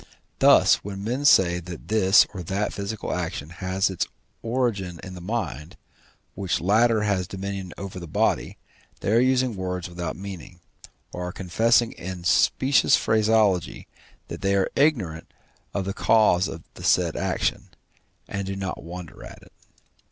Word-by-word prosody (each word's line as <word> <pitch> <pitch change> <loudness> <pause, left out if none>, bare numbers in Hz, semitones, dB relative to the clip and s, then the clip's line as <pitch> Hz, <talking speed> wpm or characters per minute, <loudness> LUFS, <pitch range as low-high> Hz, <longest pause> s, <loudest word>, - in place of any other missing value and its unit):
Thus, - - +6
when 100 -1 -6
men 125 +6 -2
say 90 -10 +5
that 90 -1 -9
this 105 -3 +5
or 95 - -6
that 95 +4 -2
physical 100 +2 -4
action 75 +3 -4
has 95 +2 -1
its 95 - -2 0.3
origin 110 -8 -2
in 95 - -8
the 90 - -9
mind, 90 - -4 0.6
which 95 -2 -2
latter 110 +4 +3
has 100 -4 0
dominion 95 -1 -5
over 95 -2 -7
the 85 - -8
body, 80 - 0 0.4
they - - -1
are 115 - +5
using 130 -2 +2
words 90 -1 -4
without 85 -2 -5
meaning, 95 -2 -9 0.5
or 90 0 -4
are - - -4
confessing 115 +6 +2
in 90 0 -7
specious 130 +9 +3
phraseology 110 -4 +1 0.4
that - - -7
they 100 0 +1
are 95 -1 +1
ignorant 105 - 0 0.4
of 100 -2 -3
the 100 - -3
cause 105 -5 +3
of 80 - -8
the - - -11
said - - +2
action, - - -2 0.6
and 100 -1 -4
do 95 - -3
not 95 -2 -4
wonder 85 0 -9
at - - -12
it. - - -20
95 Hz, 155 wpm, -24 LUFS, 90-110 Hz, 0.6 s, Thus